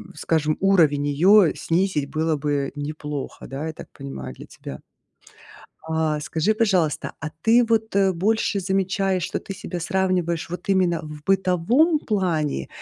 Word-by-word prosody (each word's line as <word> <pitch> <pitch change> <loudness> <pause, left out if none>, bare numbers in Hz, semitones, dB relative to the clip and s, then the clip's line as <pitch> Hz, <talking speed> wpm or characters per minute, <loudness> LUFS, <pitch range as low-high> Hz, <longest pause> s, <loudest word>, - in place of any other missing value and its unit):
скажем, 155 -2 0
уровень 155 -7 +3
её 180 +5 +5
снизить 165 -5 0
было 160 0 0
бы 145 -1 -1
неплохо. 145 -1 -6
Да, 140 +4 -5
я 160 - -4
так - - -11
понимаю, 65 -2 -7
для - - -12
тебя. 65 - -9 1.1
А, 160 -1 0
скажи, 160 +7 0
пожалуйста, 185 -9 +1
а 155 -1 -4
ты 235 +2 +5
вот, 220 -2 0
э, 195 -1 +3
больше 205 +3 0
замечаешь, 190 0 0
что - - -2
ты 195 - -8
себя 180 -1 -6
сравниваешь 175 -2 -1
вот 180 +3 -7
именно 180 -3 +2
в 150 -1 -9
бытовом 195 - +2
плане? 165 - -1
170 Hz, 145 wpm, -23 LUFS, 150-195 Hz, 1.1 s, её